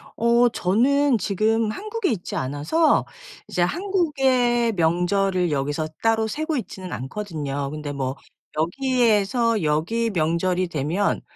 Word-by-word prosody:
어 235 +1 +4
저는 250 +7 +2
지금 215 +3 +1
한국에 430 - -3
있지 195 -6 -4
않아서 145 - +1 0.4
이제 180 - -2
한국의 265 - +1
명절을 180 +1 +1
여기서 145 +2 -1
따로 225 -1 +2
쇠고 310 +6 -2
있지는 190 -6 -6
않거든요. 145 -3 -4
근데 150 -1 -5
뭐 135 -1 -3 0.4
여기에서 230 - +1
여기 165 +10 0
명절이 180 +1 0
되면 165 +6 -1
205 Hz, 260 characters per minute, -23 LUFS, 160-240 Hz, 0.4 s, 어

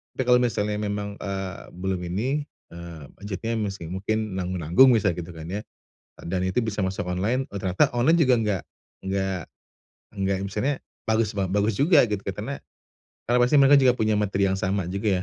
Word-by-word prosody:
tapi - - -1
kalau 125 0 +5
misalnya 105 -4 0
memang, 100 -1 -3
eee, 95 -1 -5
belum 95 0 -2
ini, 130 +11 -1 0.3
eee, 85 -2 -9 0.2
budgetnya 105 +3 -4
masih 95 -6 -4
mungkin 110 +3 -2
nanggung-nanggung 90 - +4
misal 105 -5 +2
gitu 85 0 -6
kan 80 - -8
ya? 100 - -2 0.6
Dan 90 +2 -2
itu 95 +6 +1
bisa 105 -3 -2
masuk 95 -1 -3
online, 110 +9 -1
ternyata 95 -2 +1
online 125 +8 +4
juga 130 -5 +5
enggak 105 -5 -1 0.4
enggak 95 -1 -2 0.7
enggak, 95 -1 0
misalnya 105 +9 -1 0.3
bagus 110 -1 +1
ba 100 - 0
bagus 105 +2 +1
juga 145 - +5
gitu. 105 -2 -2
Karena 105 +8 -4 0.8
karena 125 - +4
pasti 125 +4 +3
mereka 140 +1 +7
juga 130 -3 +5
punya 110 -3 +1
materi 100 -1 +1
yang 95 - -1
sama 95 -1 -1
juga 100 -1 0
100 Hz, 170 wpm, -25 LUFS, 95-115 Hz, 0.8 s, mereka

